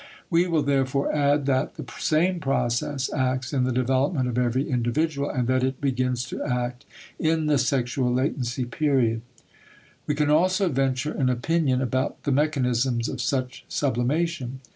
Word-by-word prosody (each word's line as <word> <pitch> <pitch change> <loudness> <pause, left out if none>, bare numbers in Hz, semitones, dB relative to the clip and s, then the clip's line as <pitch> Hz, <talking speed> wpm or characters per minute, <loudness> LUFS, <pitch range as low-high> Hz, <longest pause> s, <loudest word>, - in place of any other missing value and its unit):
We 170 +2 +3
will 160 -4 +1
therefore 140 -1 +1
add 145 -1 +2
that 130 -1 0
the - - -7
same 175 +3 +2
process 130 -1 -1
acts 130 -1 -1
in 130 -2 +2
the 130 - 0
development 130 +3 +1
of 125 - -3
every 125 +3 +1
individual, 140 +4 0
and 125 -3 -1
that 130 0 +2
it 130 0 -1
begins 125 -3 0
to - - -4
act 125 0 -2 0.3
in 160 0 +1
the 150 -2 +3
sexual 125 -1 0
latency 125 -1 -1
period. 120 -3 +1 0.9
We 150 - 0
can 150 0 +1
also 185 +4 +3
venture 135 +1 0
an 130 -3 0
opinion 130 +1 +1
about 130 +2 -2
the 145 - 0
mechanisms 130 -4 +1
of 130 - -4
such 130 -1 -2
sublimation. 135 0 -1
130 Hz, 155 wpm, -25 LUFS, 125-145 Hz, 0.9 s, We